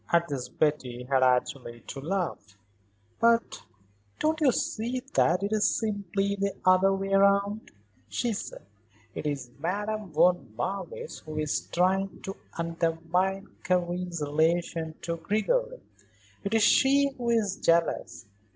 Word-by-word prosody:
At 170 -1 +3
this 135 -4 -4
Betty 130 -5 -1
had 130 +1 +1
actually 125 -1 +1
to 135 - -8
laugh. 155 - -3 0.6
"But 230 0 +2 0.5
don't 315 +1 0
you 280 -4 +5
see 245 +2 -2
that 180 +4 +3
it 205 +2 -1
is 215 0 +3
simply 200 -2 -1
the 200 0 -1
other 185 +1 +5
way 195 0 -2
round?" 200 +2 +3 0.4
she 235 -2 -1
said. 205 - -7 0.5
"It - - -4
is 135 -4 -3
Madame 205 +5 -2
von 165 -7 +2
Marwitz 465 - -4
who 155 0 -8
is 150 -1 -1
trying 190 +2 +1
to 195 - -5 0.2
undermine 170 +3 -1 0.2
Karen's 180 -2 -1
relation 160 +2 0
to 170 0 -2
Gregory. - - -1 0.6
It 200 +2 -1
is 220 - +4
she 275 +4 +5
who 240 -2 -3
is 215 -5 +1
jealous. 165 -7 +1
185 Hz, 135 wpm, -28 LUFS, 160-210 Hz, 0.6 s, you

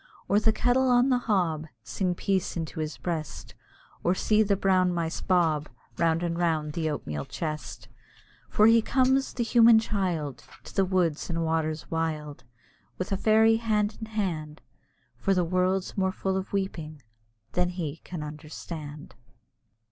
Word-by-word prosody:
Or 205 - +4
the 220 +1 +3
kettle 250 +3 +2
on 245 +1 +4
the 250 -1 +3
hob 175 -9 0 0.2
Sing 180 +4 -2
peace 190 -1 -1
into 160 -1 -4
his 155 -1 -3
breast; 160 -5 -5 0.5
Or 175 - +2
see 215 +3 +2
the 205 -2 +3
brown 185 -2 +2
mice 170 -1 -2
bob 160 -5 +1 0.3
Round 165 0 +2
and 170 0 -2
round 155 -3 0
the 160 -1 -1
oatmeal 75 - -4
chest. 155 -2 -5 0.6
For 210 - +4
he 230 +1 +6
comes, 265 +3 +2
the 240 - -2
human 230 0 +6
child, 180 - -1 0.2
To - - -12
the 195 - +3
woods 180 -5 0
and 165 -1 -1
waters 160 -1 -2
wild, 155 -3 -3 0.5
With 185 - -4
a - - +2
fairy 220 +2 +4
hand 215 -2 0
in 220 - -6
hand, 170 -8 -3 0.6
For 195 -1 +1
the 180 -1 +2
world's 185 +2 0
more 190 -1 +1
full 190 0 -2
of 190 0 -3
weeping 160 -7 -4 0.5
than 180 0 +1
he 165 -4 -4
can 165 -2 -7
understand. 150 0 -8
180 Hz, 155 wpm, -27 LUFS, 160-205 Hz, 0.6 s, he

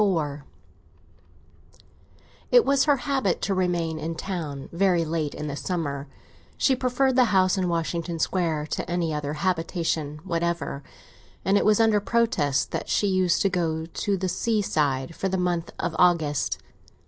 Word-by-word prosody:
XXXIV 155 -8 0 2.1
IT - - +6
was 275 -1 +3
her 290 -2 +4
habit 265 -7 0
to 195 - +1
remain 175 -4 0
in 165 +1 -4
town 160 -6 -5
very 175 -1 +2
late 155 -2 -2
in 150 - -5
the 145 -1 -3
summer; 145 -4 -3 0.5
she 265 - +3
preferred 255 +1 +1
the 255 -1 +6
house 190 -4 +3
in 185 -2 0
Washington 170 0 -2
Square 160 -3 0
to - - -3
any 170 -2 0
other 150 -1 -3
habitation 165 -3 -1
whatever, 170 -5 -2 0.6
and 195 - +3
it - - +3
was 215 0 +4
under 220 -2 +4
protest 205 - +1
that - - -4
she - - +2
used 185 -3 +2
to 195 - +3
go 165 -3 -1
to 195 +4 -2
the 185 +1 -2
seaside 160 - 0
for 195 - -2
the 190 - 0
month 175 -2 -1
of 170 - -2
August. 160 -5 +2
175 Hz, 155 wpm, -25 LUFS, 160-195 Hz, 2.1 s, IT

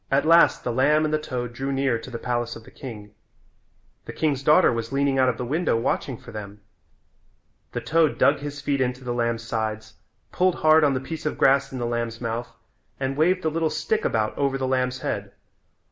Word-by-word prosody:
At 140 +2 +2
last 170 +1 +5
the 120 - -1
lamb 150 +5 +3
and 155 - -1
the 155 - +2
toad 125 -5 -4
drew 135 +3 -3
near 135 -3 0
to 125 - -10
the 120 - -5
palace 120 0 -2
of 115 - -11
the - - -16
king. 105 -5 -9 0.9
The - - -6
king's 145 -4 0
daughter 150 0 +5
was 115 +1 -4
leaning 140 -1 +1
out 130 -1 +4
of 120 - -2
the 125 - -4
window 155 0 0
watching 125 +1 -1
for 115 - -13
them. 105 -1 -8 1.1
The - - -3
toad 160 -2 +2
dug 145 0 +4
his 145 0 -6
feet 140 -1 0
into 125 0 -2
the 120 -1 -3
lamb's 115 -1 -1
sides, 110 -1 -3 0.4
pulled 185 -1 +2
hard 155 0 +5
on 140 -2 +3
the - - 0
piece 155 +3 -5
of - - -1
the - - -15
grass 135 0 +3
in 130 - -5
the 120 - -2
lamb's 115 -1 -3
mouth 115 0 -4 0.5
and 135 0 -2
waved 180 +5 +2
the 160 - 0
little 160 0 0
stick 160 +8 -1
about 110 -1 0
over 140 -1 +1
the 135 - -2
lamb's 130 -1 -1
head. - - -4
130 Hz, 220 wpm, -24 LUFS, 115-150 Hz, 1.1 s, last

